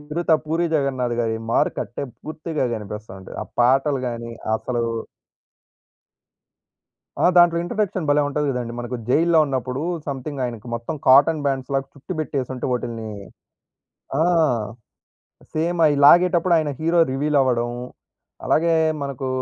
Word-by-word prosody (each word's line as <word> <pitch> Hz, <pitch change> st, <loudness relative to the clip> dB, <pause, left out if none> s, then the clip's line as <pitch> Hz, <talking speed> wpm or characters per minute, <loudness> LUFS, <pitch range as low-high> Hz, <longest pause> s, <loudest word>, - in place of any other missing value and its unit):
'చిరుత'. 160 Hz, +2 st, 0 dB
'పూరి 165 Hz, +3 st, 0 dB
జగన్నాథ్' 130 Hz, -4 st, 0 dB
గారి 110 Hz, -1 st, -1 dB, 0.2 s
మార్కట్టే 120 Hz, -, -1 dB, 0.2 s
పూర్తిగా 155 Hz, -1 st, -4 dB
గనిపిస్తా 105 Hz, -1 st, -7 dB
ఉంటది. 95 Hz, -, -11 dB
ఆ -, -, -7 dB, 0.2 s
పాటలు 135 Hz, +3 st, +3 dB
గానీ, 115 Hz, 0 st, -6 dB, 0.3 s
అసలూ 120 Hz, 0 st, -2 dB, 2.4 s
ఆ! -, -, +2 dB
దాంట్లో 175 Hz, -1 st, +6 dB
ఇంట్రడక్షన్ 185 Hz, -2 st, -2 dB
భలే 145 Hz, 0 st, +4 dB
ఉంటది 145 Hz, +1 st, -1 dB
గదండీ! 125 Hz, -2 st, -3 dB
మనకు 120 Hz, +1 st, -4 dB
జైల్లో 165 Hz, +5 st, +4 dB
ఉన్నప్పుడూ, 130 Hz, +1 st, -3 dB, 0.2 s
సమ్‌థింగ్ 140 Hz, 0 st, -5 dB
ఆయనకి 120 Hz, -2 st, -6 dB
మొత్తం 115 Hz, +7 st, -4 dB
కాటన్ 145 Hz, +4 st, +6 dB
బ్యాండ్స్‌లాగా 135 Hz, 0 st, -1 dB
చుట్టి 140 Hz, +7 st, -8 dB
బెట్టేసుంటే, 130 Hz, -4 st, -3 dB
వాటిల్ని 115 Hz, -3 st, -4 dB, 1.1 s
ఆ! -, -, +3 dB, 1.3 s
సేమయి 160 Hz, -1 st, +2 dB
లాగేటప్పుడు 175 Hz, +2 st, +6 dB
ఆయన 150 Hz, -2 st, -1 dB
హీరో 165 Hz, +2 st, +1 dB
రివీలవడం, 135 Hz, -4 st, +1 dB, 0.8 s
అలాగే 165 Hz, +1 st, +2 dB, 0.3 s
మనకూ 135 Hz, -1 st, -4 dB
140 Hz, 115 wpm, -22 LUFS, 125-160 Hz, 2.4 s, దాంట్లో